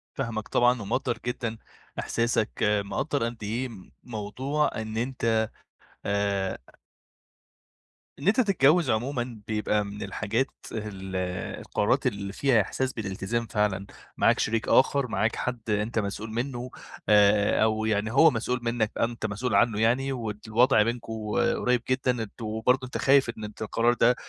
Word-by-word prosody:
فاهمك 115 Hz, -5 st, -3 dB
طبعًا، 120 Hz, 0 st, +3 dB
ومقدّر 120 Hz, +4 st, -1 dB
جدًا 120 Hz, -2 st, -3 dB, 0.4 s
إحساسك، 115 Hz, -2 st, 0 dB, 0.4 s
مقدّر 140 Hz, +4 st, -1 dB
قد 115 Hz, -2 st, -5 dB
إيه 120 Hz, +5 st, -2 dB, 0.3 s
موضوع 125 Hz, +7 st, -1 dB
إن 110 Hz, 0 st, -5 dB
أنت 115 Hz, -2 st, +1 dB, 0.6 s
آآ 100 Hz, -1 st, 0 dB, 1.6 s
إن 140 Hz, -, -4 dB
أنتَ 220 Hz, +6 st, +5 dB
تتجوز 170 Hz, -, +3 dB
عمومًا، 120 Hz, 0 st, -2 dB
بيبقى 105 Hz, -1 st, 0 dB
من 100 Hz, +1 st, -8 dB
الحاجات -, -, -1 dB, 0.2 s
ال 95 Hz, -3 st, -6 dB, 0.4 s
القرارات 130 Hz, +6 st, +1 dB
اللي 100 Hz, -4 st, -3 dB
فيها 125 Hz, -1 st, +3 dB
إحساس 130 Hz, +6 st, -2 dB
بالالتزام 110 Hz, +2 st, -3 dB
فعلًا. 105 Hz, -3 st, 0 dB, 0.3 s
معاك -, -, +4 dB
شريك 115 Hz, 0 st, 0 dB
آخر، 135 Hz, 0 st, +4 dB
معاك 115 Hz, -1 st, 0 dB
حد 120 Hz, -3 st, -4 dB
أنتَ 105 Hz, +2 st, 0 dB
مسؤول 105 Hz, +2 st, -4 dB
منه، 125 Hz, +1 st, -3 dB, 0.4 s
آآ، 105 Hz, 0 st, +5 dB
أو 110 Hz, 0 st, +1 dB
يعني 110 Hz, 0 st, 0 dB
هو 155 Hz, +5 st, +6 dB
مسؤول 125 Hz, +2 st, -1 dB
منك، 115 Hz, -2 st, 0 dB
أنتَ 115 Hz, -1 st, -1 dB
مسؤول 110 Hz, +2 st, -1 dB
عنه 110 Hz, 0 st, +3 dB
يعني 130 Hz, +4 st, +2 dB
والوضع 110 Hz, -1 st, +2 dB
بينكم 115 Hz, 0 st, -3 dB, 0.4 s
قريب 125 Hz, -1 st, +1 dB
جدًا. 130 Hz, 0 st, +2 dB
أنتم 110 Hz, +1 st, -6 dB
برضو 130 Hz, +1 st, +3 dB
أنتَ 125 Hz, -, -5 dB
خايف 135 Hz, -2 st, +4 dB
إن 115 Hz, -2 st, -6 dB
أنتَ 105 Hz, +1 st, -8 dB
القرار 115 Hz, +2 st, +2 dB
ده 120 Hz, +1 st, +4 dB
115 Hz, 140 wpm, -27 LUFS, 105-125 Hz, 1.6 s, هو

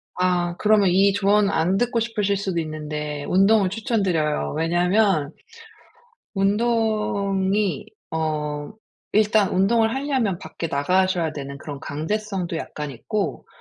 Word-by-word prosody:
아. 180 Hz, -1 st, 0 dB
그러면 210 Hz, -2 st, +4 dB
이 195 Hz, +2 st, +4 dB
조언 200 Hz, +1 st, +3 dB
안 175 Hz, +2 st, +1 dB
듣고 240 Hz, +1 st, +1 dB
싶으실 210 Hz, -3 st, 0 dB
수도 190 Hz, -4 st, -2 dB
있는데 150 Hz, -2 st, -4 dB
운동을 195 Hz, +1 st, +4 dB
추천드려요. 195 Hz, -, -1 dB
왜냐하면 175 Hz, -1 st, +2 dB, 1.0 s
운동이 200 Hz, -2 st, 0 dB, 0.2 s
어 150 Hz, -1 st, -2 dB, 0.4 s
일단 210 Hz, -1 st, +3 dB
운동을 225 Hz, +4 st, +2 dB
하려면 265 Hz, -9 st, -1 dB
밖에 165 Hz, -, -6 dB
나가셔야 175 Hz, +2 st, +1 dB
되는 140 Hz, -1 st, -7 dB
그런 145 Hz, -2 st, -8 dB
강제성도 180 Hz, +3 st, -3 dB
약간 150 Hz, -2 st, -5 dB
있고 195 Hz, -, -3 dB
190 Hz, 265 characters per minute, -23 LUFS, 160-210 Hz, 1.0 s, 그러면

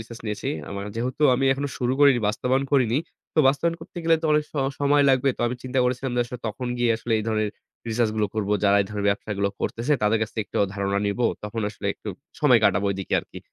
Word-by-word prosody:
research 115 Hz, +1 st, -10 dB
নিয়েছি। 105 Hz, -1 st, -3 dB, 0.2 s
আমার 100 Hz, 0 st, -5 dB
যেহেতু 130 Hz, +5 st, -2 dB
আমি 135 Hz, -, 0 dB
এখনো 140 Hz, +1 st, -3 dB
শুরু 125 Hz, 0 st, 0 dB
করিনি, 140 Hz, -4 st, +6 dB
বাস্তবায়ন 130 Hz, +5 st, 0 dB
করিনি। 125 Hz, -3 st, +3 dB, 0.4 s
তো -, -, -1 dB
বাস্তবায়ন 165 Hz, +5 st, +1 dB
করতে 160 Hz, -, -13 dB
গেলে 165 Hz, 0 st, +5 dB
তো -, -, +1 dB
অনেক 150 Hz, 0 st, +3 dB
স -, -, -45 dB, 0.3 s
সময় 145 Hz, 0 st, +4 dB
লাগবে। 130 Hz, +1 st, +3 dB
তো -, -, -9 dB
আমি 125 Hz, -, -1 dB
চিন্তা 130 Hz, 0 st, -2 dB
করেছিলাম 125 Hz, +1 st, -1 dB
যে -, -, +3 dB
আসলে 125 Hz, +1 st, -8 dB
তখন 125 Hz, +4 st, -4 dB
গিয়ে 120 Hz, -1 st, +2 dB
আসলে 115 Hz, 0 st, -4 dB
এই 110 Hz, -, -3 dB
ধরনের 110 Hz, -1 st, 0 dB, 0.4 s
research 115 Hz, -1 st, +1 dB
গুলো 105 Hz, -, +2 dB
করব। 105 Hz, -2 st, -2 dB, 0.2 s
যারা 100 Hz, 0 st, +5 dB
এই 95 Hz, -, -8 dB
ধরনের 100 Hz, -1 st, -2 dB
ব্যবসাগুলো 100 Hz, 0 st, -1 dB
করতেছে 120 Hz, +6 st, -1 dB
তাদের 105 Hz, +1 st, +3 dB
কাছ 110 Hz, -, -3 dB
থেকে 110 Hz, -, +1 dB
একটু -, -, -4 dB, 0.2 s
ধারণা 100 Hz, 0 st, 0 dB
নিব। 100 Hz, +4 st, -2 dB, 0.2 s
তখন 110 Hz, +2 st, -4 dB
আসলে 105 Hz, -1 st, -7 dB
একটু 110 Hz, -, -9 dB, 0.3 s
সময় 130 Hz, -6 st, +6 dB
কাটাবো 100 Hz, 0 st, +3 dB
ওইদিকে 95 Hz, -1 st, -2 dB
আরকি। -, -, -12 dB
115 Hz, 225 wpm, -24 LUFS, 105-130 Hz, 0.4 s, করিনি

